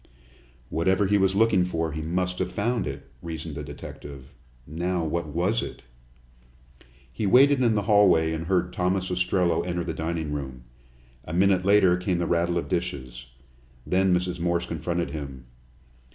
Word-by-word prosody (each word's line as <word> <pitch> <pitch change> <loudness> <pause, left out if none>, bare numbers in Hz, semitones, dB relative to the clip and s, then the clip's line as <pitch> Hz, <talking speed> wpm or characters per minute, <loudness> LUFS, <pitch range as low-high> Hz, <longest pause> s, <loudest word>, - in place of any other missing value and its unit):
"Whatever 95 +5 +2
he 100 +1 +3
was 95 0 +2
looking 105 -3 +4
for, 80 -3 -2
he 80 +1 -4
must 90 +3 -2
have - - -1
found 115 +3 -1
it," - - -6 0.2
reasoned 80 -1 -6
the 75 - -5
detective. 70 -1 -10 0.3
"Now, 85 +3 -2
what 85 +1 -2
was 90 +9 0
it?" - - -7 1.3
He 105 - -2
waited 135 +5 +5
in 115 -3 +3
the 105 - 0
hallway 95 -6 +4
and 80 +1 -4
heard 90 -1 +1
Thomas 90 +1 0
Ostrello 90 -1 +1
enter 90 -1 -2
the 85 - -4
dining 80 -2 -3
room. 65 -4 -6 0.6
A 80 - -7
minute 95 0 +3
later 95 -3 +5
came 90 0 -1
the 85 - -1
rattle 85 0 +1
of 85 - -2
dishes. 65 -8 -4 0.6
Then 95 +1 +2
Mrs. 90 0 0
Morse 85 0 0
confronted 85 +1 -3
him. 70 -5 -7
90 Hz, 160 wpm, -25 LUFS, 80-95 Hz, 1.3 s, waited